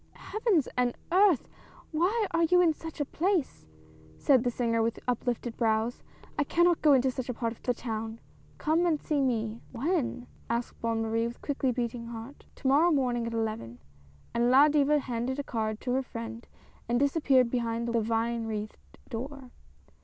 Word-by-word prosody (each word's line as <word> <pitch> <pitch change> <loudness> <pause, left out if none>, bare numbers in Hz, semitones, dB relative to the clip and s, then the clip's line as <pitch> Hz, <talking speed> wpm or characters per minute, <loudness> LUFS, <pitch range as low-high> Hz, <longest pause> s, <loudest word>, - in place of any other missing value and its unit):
" - - -34 0.2
Heavens 425 - +2
and 245 -1 +1
Earth! 370 - +4 0.4
why 375 +8 +1
are 335 0 +3
you 360 +2 +4
in 340 -3 +5
such 320 +1 -9
a 290 - +1
place? 345 0 -1 0.2
" - - -24
said 265 -5 +5
the 245 - +1
singer 230 -1 0
with 225 0 0
uplifted 245 -1 -1
brows. 225 +1 0 0.2
" - - -23
I - - +4
cannot 345 +3 +3
go 300 -2 +6
into 260 0 +3
such 255 0 -5
a 250 - -2
part 230 -1 -2
of - - -21
the 245 - 0
town; 225 -1 -4 0.4
come 325 +3 +2
and 315 -3 +1
see 295 -1 0
me." 230 -3 -1
" - - -25
When? 265 -2 -1
" - - -28
asked 235 +1 -3
Bonne 230 -1 0
Marie 225 +1 0
with 235 - -9
quickly 275 -2 0
beating 235 -1 -3
heart. 235 +4 -9
" - - -32
To 270 - -4
morrow 295 +6 +5
morning 250 -6 +1
at 230 - -4
eleven! 215 - -3 0.3
" 70 0 -28
and 235 +1 +2
La 275 +4 +7
Diva 295 0 +3
handed 255 -1 -2
a 285 - -2
card 220 -4 -2
to 250 - -2
her 260 +2 +2
friend 230 -2 -7 0.4
and 240 +1 +2
disappeared 275 -4 +3
behind 235 -1 -1
the 235 -1 +1
vine 230 +1 -1
wreathed 215 -1 -6
door. 260 +1 -6
245 Hz, 200 wpm, -29 LUFS, 230-290 Hz, 0.4 s, La